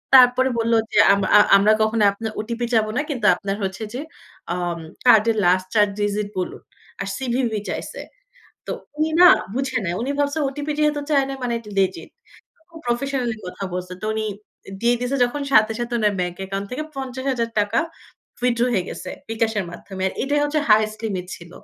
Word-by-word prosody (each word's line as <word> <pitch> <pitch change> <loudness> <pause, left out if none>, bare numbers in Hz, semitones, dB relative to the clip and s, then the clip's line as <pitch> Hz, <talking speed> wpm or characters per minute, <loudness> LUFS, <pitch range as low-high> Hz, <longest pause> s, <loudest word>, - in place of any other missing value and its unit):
তারপরে 255 0 +6
বলল 230 0 +1 0.2
যে - - -1 0.2
আম 200 - +1 0.2
আ - - +8 0.2
আমরা 210 +2 +4
কখনো 215 0 +2
আপনার 220 +2 -5
ওটিপি 235 +2 -3
চাইবো 220 -2 +4
না। - - +2
কিন্তু 250 -7 -2
আপনার 200 -1 -3
হচ্ছে 190 +2 -3
যে 250 - -4 0.6
আম 175 -1 -2 0.3
কার্ডের 225 -2 +5
লাস্ট 185 +1 +3
৪ 210 -1 +6
ডিজিট 205 0 -1
বলুন 180 - -4 0.4
আর - - -3
সিভিভি 245 -4 -1
চাইছে। - - -5 0.7
তো - - -2 0.2
উনি 310 +1 +1
না, 360 - +10 0.3
বুঝে 260 -2 -1
নাই, 170 -1 -1
উনি 270 - -2
ভাবছে 285 +1 0
ওটিপি 290 +2 -4
যেহেতু 300 -1 +2
চায় 275 -2 +4
নাই 270 - -4
মানে 245 -1 -1
এটা 220 -2 -12
লেজিট, 190 -1 -1 0.6
খুব 325 - -11
প্রফেশনালি 245 -1 -1
কথা 180 +2 -6
বলছে, 180 0 -5
তো - - -2
উনি 220 0 -1 0.4
অ্যা - - -9
দিয়ে 240 +1 +3
দিয়েছে 250 +3 -1
যখন। 265 +4 -3
সাথে, 220 -2 +5
সাথে 240 +1 -4
উনার 210 -2 +2
ব্যাংক 180 -1 -2
অ্যাকাউন্ট 195 +1 -4
থেকে 255 +5 -3
৳৫০,০০০ 245 -5 -1 0.6
উইথড্র 240 -1 +2
হয়ে 190 -6 +1
গেছে - - -7 0.2
বিকাশের 220 -3 0
মাধ্যমে। 190 +2 -8
আর - - -8
এটাই 290 +3 +1
হচ্ছে 300 +1 0
হাইয়েস্ট 215 0 +4
লিমিট 190 -5 -3
ছিল। 170 0 -14
230 Hz, 185 wpm, -22 LUFS, 205-260 Hz, 0.7 s, না